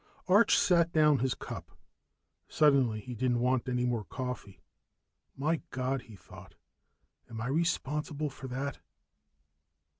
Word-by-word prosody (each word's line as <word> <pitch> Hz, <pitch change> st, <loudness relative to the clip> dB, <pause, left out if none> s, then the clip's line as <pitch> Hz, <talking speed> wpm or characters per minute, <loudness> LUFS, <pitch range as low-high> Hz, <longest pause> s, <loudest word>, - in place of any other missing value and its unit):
Arch 205 Hz, +5 st, +5 dB
set 170 Hz, -2 st, +3 dB
down 150 Hz, -3 st, +4 dB
his 130 Hz, +1 st, 0 dB
cup. -, -, -9 dB, 0.7 s
Suddenly 135 Hz, -8 st, +3 dB
he 125 Hz, +4 st, -7 dB
didn't 120 Hz, +1 st, 0 dB
want 130 Hz, +1 st, +1 dB
any 125 Hz, 0 st, 0 dB
more 120 Hz, -3 st, -1 dB
coffee. 115 Hz, -3 st, -6 dB, 0.8 s
My 155 Hz, +4 st, 0 dB
God, 130 Hz, +1 st, -2 dB
he 115 Hz, -3 st, -14 dB
thought, -, -, -14 dB, 0.7 s
_am 115 Hz, -1 st, -7 dB
I 115 Hz, -, -3 dB
responsible 150 Hz, 0 st, -1 dB
for 130 Hz, -, -9 dB
that? 135 Hz, +2 st, -4 dB
130 Hz, 125 wpm, -31 LUFS, 125-150 Hz, 0.8 s, Arch